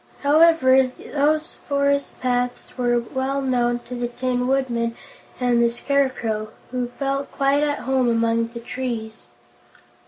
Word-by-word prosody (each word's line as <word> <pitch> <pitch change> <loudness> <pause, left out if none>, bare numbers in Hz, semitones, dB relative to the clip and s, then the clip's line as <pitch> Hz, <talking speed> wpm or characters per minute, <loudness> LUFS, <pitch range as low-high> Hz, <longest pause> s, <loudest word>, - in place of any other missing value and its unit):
However, 285 -3 +5
these 305 +2 0
forest 280 0 -1
paths 245 -1 -1
were 240 -1 +1 0.2
well 265 +1 -1
known 240 -2 0
to 250 - -8
the 240 0 -2
Tin 250 0 -2
Man 240 -3 0 0.4
and 245 -2 +2
the 235 - +4
Scarecrow, 235 -4 -1 0.2
who 250 -1 -1
felt 275 +2 -3
quite 275 +1 +2
at 295 -1 +1
home 260 -2 +2
among 230 0 +1
the 235 0 -9
trees. 230 -3 -5
255 Hz, 130 wpm, -22 LUFS, 240-275 Hz, 0.4 s, However